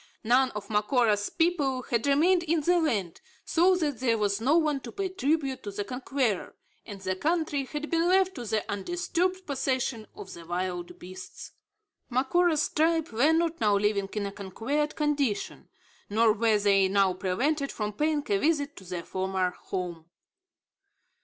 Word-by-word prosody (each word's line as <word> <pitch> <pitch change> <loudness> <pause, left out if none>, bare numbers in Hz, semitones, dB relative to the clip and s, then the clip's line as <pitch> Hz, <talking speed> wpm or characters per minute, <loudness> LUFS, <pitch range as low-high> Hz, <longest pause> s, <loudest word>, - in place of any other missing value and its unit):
None 255 +3 +4
of 210 - -5
Macora's 210 -1 +2
people 290 -7 0
had 235 +2 -1
remained 335 +6 +4
in 335 -1 0
the 350 +4 +3
land, 205 - -1 0.2
so 360 +2 +4
that 295 -8 -1
there 235 -3 +2
was 205 0 0
no 280 +7 +4
one 305 -4 +1
to - - -9
pay 390 -1 -3
tribute 300 -6 -1
to 205 - -6
the 205 +1 -4
conqueror; 250 -2 -2 0.3
and 205 -3 -8
the 185 -1 -2
country 310 - 0
had 300 +3 -6
been 335 +1 +2
left 375 +1 +3
to 245 - -7
the 215 -1 -1
undisturbed 355 - -2
possession 260 -5 -2
of 190 - -9
the 170 - -10
wild 175 +1 -4
beasts. 185 +1 -10 0.6
Macora's 305 +5 +2
tribe 325 0 +1
were 245 +8 +3
not 330 0 0
now 205 -2 +4
living 200 -1 0
in 210 -1 -2
a 200 - -4
conquered 225 +10 -2
condition; 285 -8 -1 0.4
nor 220 +1 +4
were 220 0 +2
they 200 -2 +3
now 195 -1 +3
prevented 270 +11 -1
from 210 -1 -3
paying 300 +4 0
a 200 - +3
visit 295 0 0
to 195 - -10
their 180 -2 -5
former 190 -1 -1
home. 180 -3 -6
255 Hz, 165 wpm, -28 LUFS, 200-310 Hz, 0.6 s, None